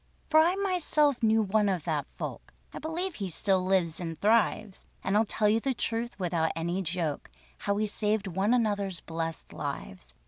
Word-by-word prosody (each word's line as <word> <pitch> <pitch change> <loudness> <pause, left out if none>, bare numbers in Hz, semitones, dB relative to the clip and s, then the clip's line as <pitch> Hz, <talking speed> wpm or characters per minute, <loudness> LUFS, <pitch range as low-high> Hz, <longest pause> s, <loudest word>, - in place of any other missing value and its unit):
For 315 - +7
I 340 +4 +4
myself 330 -8 +2
knew 220 -1 +4
one 210 +1 +2
of 180 -5 -1
that 150 -4 -1
folk - - -7 0.2
(I - - -6
believe 345 +4 -3
he 195 -8 -4
still 190 +2 +1
lives 185 -4 +1
and 165 -3 -5
thrives), 215 -2 +1 0.2
And 195 - 0
I'll 220 +2 +4
tell 210 +1 +2
you 215 +2 +4
the 265 +2 -1
truth 230 +1 -2
without 170 -3 0
any 170 +3 -1
joke 165 -4 -2 0.3
How 200 - 0
we 215 +1 +1
saved 210 0 0
one 190 +3 0
another's 205 -6 +1
blest 165 0 -5
lives. - - -6
200 Hz, 180 wpm, -29 LUFS, 170-225 Hz, 0.3 s, For